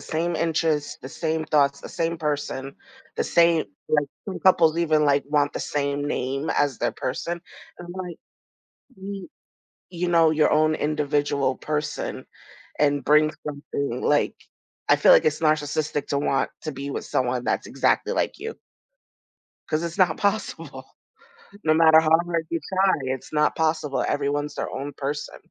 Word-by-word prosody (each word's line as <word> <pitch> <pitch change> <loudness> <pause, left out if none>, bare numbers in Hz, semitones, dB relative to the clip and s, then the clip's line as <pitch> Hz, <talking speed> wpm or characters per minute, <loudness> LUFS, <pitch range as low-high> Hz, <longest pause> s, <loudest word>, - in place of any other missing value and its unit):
same 165 +1 -2
interests, 160 -3 0
the 130 - -7
same 160 +2 -2
thoughts, 140 -2 +2
the - - -9
same 165 0 -2
person, 145 -3 -3 0.4
the - - 0
same, 170 -2 +4 0.2
like, 150 -2 +2 0.2
some 190 - -4
couples 170 -3 +4
even 155 -2 +3
like 140 -1 +3
want 145 -1 +1
the - - -4
same 145 0 -2
name 135 +1 -2
as 145 -3 +1
their 120 - 0
person. 170 +6 -4 0.4
I'm 175 - -8
like, 180 -3 -6 0.8
"You 195 -1 -7 0.6
you 175 0 -2
know, 165 -2 +4
your 155 -1 +3
own 155 +1 +3
individual 145 -3 0
person 150 +2 -4 0.5
and 145 -2 +2
bring 150 +1 +5
something," 140 -3 -4
like, 145 - +2 0.5
I - - +7
feel, - - +5
like, - - +6
it's 155 -1 +1
narcissistic 155 -1 0
to 140 - 0
want 140 -1 0
to 155 - -3
be 140 0 -6
with - - -4
someone 125 -1 -1
that's - - -1
exactly - - +1
like - - -1
you. 455 0 -5 1.1
'Cause 155 +1 -1
it's 170 +2 -4
not 180 -4 +3
possible. 205 +2 -2 0.8
No 155 0 +4
matter 160 0 +7
how 160 - -1 0.2
hard 165 -2 -1
you 165 - -2
try, 190 0 +3
it's 130 -1 -4
not 150 0 +2
possible. 155 -3 0
Everyone's 145 +1 -1
their - - -4
own 140 +2 -5
person. 145 +2 -4
150 Hz, 160 wpm, -24 LUFS, 145-165 Hz, 1.1 s, I